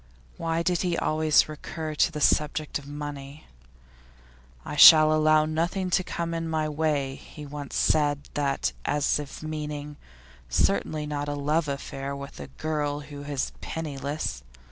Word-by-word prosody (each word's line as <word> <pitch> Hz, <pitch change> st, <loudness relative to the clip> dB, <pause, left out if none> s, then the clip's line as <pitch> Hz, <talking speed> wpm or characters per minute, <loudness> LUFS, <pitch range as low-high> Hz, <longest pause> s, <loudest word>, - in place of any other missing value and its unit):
Why 165 Hz, 0 st, -1 dB
did 175 Hz, 0 st, +1 dB
he 175 Hz, -2 st, 0 dB
always 155 Hz, 0 st, +3 dB
recur 155 Hz, +1 st, -6 dB
to 150 Hz, -, +2 dB
the 150 Hz, -, -5 dB
subject 150 Hz, +1 st, +1 dB
of 140 Hz, -, -14 dB
money? 145 Hz, 0 st, -7 dB, 1.2 s
'I -, -, -5 dB
shall 155 Hz, +1 st, +9 dB
allow 155 Hz, 0 st, +4 dB
nothing 175 Hz, +4 st, -1 dB
to 185 Hz, -, +3 dB
come 170 Hz, -1 st, -3 dB
in 165 Hz, 0 st, -3 dB
my 155 Hz, -1 st, 0 dB
way;' 150 Hz, -3 st, 0 dB
he 150 Hz, +2 st, -11 dB
once 145 Hz, -1 st, -7 dB
said 145 Hz, -2 st, +2 dB
that 140 Hz, -, 0 dB
as 150 Hz, 0 st, +1 dB
if 145 Hz, +1 st, -8 dB
meaning, 150 Hz, -1 st, -5 dB, 0.5 s
'certainly 150 Hz, -, +1 dB
not 145 Hz, -1 st, -3 dB
a 145 Hz, -, -2 dB
love 150 Hz, +3 st, 0 dB
affair 140 Hz, 0 st, -4 dB
with 140 Hz, 0 st, -9 dB
a 70 Hz, -, -7 dB
girl 145 Hz, -, -2 dB
who 145 Hz, 0 st, -9 dB
is 140 Hz, -2 st, -2 dB
penniless. 145 Hz, -, -4 dB
150 Hz, 150 wpm, -26 LUFS, 145-155 Hz, 1.2 s, shall